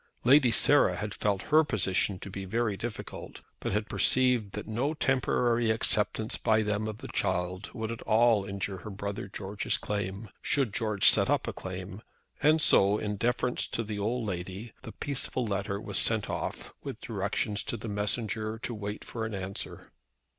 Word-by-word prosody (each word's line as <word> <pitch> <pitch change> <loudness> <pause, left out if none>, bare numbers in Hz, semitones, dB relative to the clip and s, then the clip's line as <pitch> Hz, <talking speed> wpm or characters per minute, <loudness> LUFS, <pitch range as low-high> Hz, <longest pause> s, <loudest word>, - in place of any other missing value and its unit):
Lady 130 +1 +6
Sarah 115 - +4
had 105 0 -4
felt 100 -2 0
her 155 +1 +8
position 100 -7 0
to 100 +1 -8
be 95 +1 -5
very 110 +2 0
difficult, 115 +2 -7 0.2
but - - -3
had 105 +2 0
perceived 125 -6 +2
that 105 - -5
no 130 +8 -1
temporary 120 -4 +2
acceptance 110 0 +1
by 110 0 +3
them 105 +1 -1
of 110 -1 -5
the - - -8
child 90 +2 -1
would 110 -1 -3
at 115 - -6
all 110 -1 +4
injure 100 0 -4
her 105 - -8
brother 100 +1 -5
George's 100 +1 -2
claim, 100 +1 -3
should 135 -5 +1
Lord - - -18
George 105 -3 +2
set - - +4
up - - +1
a - - -2
claim, 95 +2 -7 0.4
and 155 +2 +5
so, 100 -8 +5
in 105 -1 -2
deference 125 +2 0
to 115 - -2
the 105 -1 -5
old 115 +3 -1
lady, 95 +4 -5
the 115 - -8
peaceful 130 -2 -1
letter 100 -1 -2
was 110 - -1
sent 110 -2 +2
off, - - -4
with - - -6
directions 105 -1 -2
to 120 - -2
the 115 - -7
messenger 110 +1 -1
to 120 +1 -5
wait 105 -1 -5
for 115 - -5
an 110 - -5
answer. 95 0 -5
105 Hz, 180 wpm, -29 LUFS, 100-115 Hz, 0.4 s, her